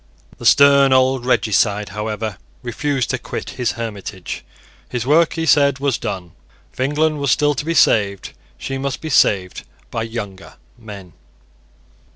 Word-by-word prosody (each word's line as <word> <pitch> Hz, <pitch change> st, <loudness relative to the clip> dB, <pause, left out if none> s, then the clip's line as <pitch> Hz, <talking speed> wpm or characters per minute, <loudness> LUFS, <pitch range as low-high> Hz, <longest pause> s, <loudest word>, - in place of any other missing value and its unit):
The -, -, 0 dB
stern 140 Hz, -1 st, +6 dB
old 130 Hz, -1 st, +2 dB
regicide, 105 Hz, -3 st, +1 dB
however, 105 Hz, 0 st, -4 dB, 0.2 s
refused 130 Hz, +2 st, -2 dB
to -, -, -2 dB
quit -, -, -6 dB
his 125 Hz, -2 st, -2 dB
hermitage. 105 Hz, -5 st, -6 dB, 0.5 s
His 125 Hz, -2 st, -3 dB
work, 155 Hz, +4 st, +3 dB
he 165 Hz, -1 st, -2 dB
said, 140 Hz, -3 st, +4 dB
was 140 Hz, -3 st, -1 dB
done. 95 Hz, -6 st, -5 dB, 0.4 s
If -, -, -21 dB
England 150 Hz, +3 st, +1 dB
was 140 Hz, -1 st, -1 dB
still 145 Hz, +4 st, +3 dB
to 145 Hz, -, -4 dB
be 165 Hz, +2 st, -2 dB
saved, 100 Hz, -8 st, +2 dB, 0.2 s
she 135 Hz, 0 st, -5 dB
must 135 Hz, 0 st, -3 dB
be 155 Hz, -, -6 dB
saved 95 Hz, -8 st, +2 dB, 0.3 s
by 115 Hz, -, -3 dB
younger 105 Hz, -4 st, -7 dB, 0.2 s
men. 100 Hz, -7 st, -11 dB
125 Hz, 150 wpm, -19 LUFS, 105-140 Hz, 0.5 s, stern